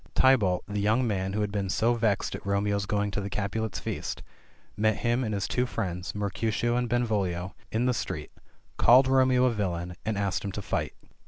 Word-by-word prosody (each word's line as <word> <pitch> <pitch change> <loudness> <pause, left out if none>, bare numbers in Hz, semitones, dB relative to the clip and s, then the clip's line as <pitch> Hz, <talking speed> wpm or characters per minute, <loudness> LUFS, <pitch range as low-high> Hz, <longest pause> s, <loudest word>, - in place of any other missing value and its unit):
Tybalt, 105 -9 +4
the 105 0 -2
young 110 +5 +2
man 95 -3 -1
who 105 - 0
had 105 -1 -1
been 100 -2 -2
so 115 +5 +2
vexed 110 -4 0
at - - -6
Romeo's 100 0 0
going 105 0 0
to 100 - -2
the 100 - -4
Capulet's 105 +2 -2
feast, - - -4 0.5
met 110 0 +2
him 120 +2 +1
and 110 - -2
his 100 -3 -1
two 125 0 0
friends, 90 -5 -4
Mercutio 110 +3 -1
and 125 -1 0
Benvolio, 100 -7 0 0.2
in 115 +3 +1
the 125 - +3
street, - - -4 0.5
called 130 +3 +6
Romeo 130 -1 +4
a 125 - +3
villain, 90 -5 -3
and 110 -1 -2
asked 100 -4 -1
him 100 - -3
to 105 - -4
fight. - - -2
105 Hz, 195 wpm, -28 LUFS, 100-120 Hz, 0.5 s, called